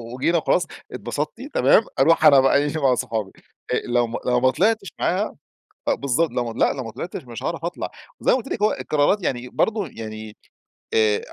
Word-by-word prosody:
وجينا 170 +6 +1
وخلاص، 155 - +1 0.3
اتبسطتِ؟ - - -4
تمام، - - +5 0.2
أروح 165 +5 +4
أنا 140 - +8
بقى 135 +1 +4
إيه، 145 +2 0
مع 130 -2 +4
صحابي. 110 -4 -3 0.4
آآ، - - +3
لو 120 0 +1
ما 115 - -4
لو 125 0 +2
ما 130 +1 +3
طلعتش 205 - 0
معاها 190 +5 0 0.5
بالضبط، 140 +4 +1
لو 125 0 -1
ما 115 - -10
لأ، - - +3
لو 130 - -5
ما 115 - -6
طلعتش 170 +4 -6
مش 120 -2 -8
هاعرف 165 -1 -3
أطلع. 175 +1 -4 0.3
وزي - - +2
ما - - +4
قلت 265 +1 -5
لِك 210 - -4
هو 215 - +4
القرارات 155 +7 +1
يعني 125 -1 -2
برضه، 210 - 0
يعني، 110 -2 -8 0.6
آآ 110 -2 +3
135 Hz, 195 wpm, -22 LUFS, 120-170 Hz, 0.6 s, أنا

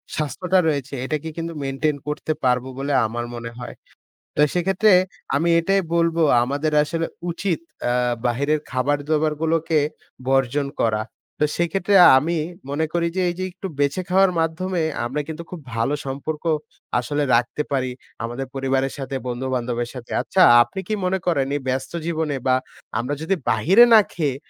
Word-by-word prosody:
স্বাস্থ্যটা 180 +5 0
রয়েছে 145 -3 -1
এটাকে 155 +3 -3
কিন্তু 165 0 -4
মেইনটেইন 140 +2 -1
করতে 150 +1 -2
পারব 125 -1 +2
বলে 140 +1 -2
আমার 120 +2 -3
মনে 115 0 -6
হয়। 120 - -7 0.6
তো - - +2
সেক্ষেত্রে 195 +4 +3 0.4
আমি 165 +5 +2
এটাই 195 +4 +2
বলব 170 0 +2 0.3
আমাদের 145 +5 -1
আসলে 165 +2 -2 0.2
উচিৎ 175 0 -1 0.3
আ - - +2 0.3
বাহিরের 140 +6 +1
খাবার-দাবার 145 +4 +1
গুলোকে 160 0 +1 0.5
বর্জন 135 +1 +1
করা। 110 -1 +1 0.4
তো 150 - +4
সেক্ষেত্রে 175 +4 +1 0.2
আমি 165 +5 0 0.3
মনে 145 +3 0
করি 170 -1 +1
যে, 190 - +1
এই 175 - -4
যে - - -1
একটু 190 +2 -7
বেঁছে 145 +5 +1
খাওয়ার 190 0 +4
মাধ্যমে 165 +2 -1 0.2
আমরা 135 +5 -2
কিন্তু 160 +1 -6
খুব 180 - -6 0.2
ভালো 115 +5 0
সম্পর্ক 140 +3 -4 0.6
আসলে 145 +4 -1
রাখতে 120 +5 0
পারি, 130 -2 0 0.3
আমাদের 120 +3 -4
পরিবারের 135 0 0
সাথে 135 0 -4
বন্ধু-বান্ধবের 120 -1 -2
সাথে। 125 -2 -9
আচ্ছা 190 - +1 0.2
আপনি 190 +10 -2
কি 215 - -1
মনে 190 +1 +1
করেন 145 -7 +1
এই 145 - -2
ব্যস্ত 130 +1 -2
জীবনে 160 -3 -1
বা 130 - +5 0.4
আমরা 125 +5 -2
যদি 165 +5 +1
বাহিরে 180 - +6
না 220 - +10
খেয়ে 145 -6 -1
150 Hz, 155 wpm, -22 LUFS, 130-170 Hz, 0.6 s, না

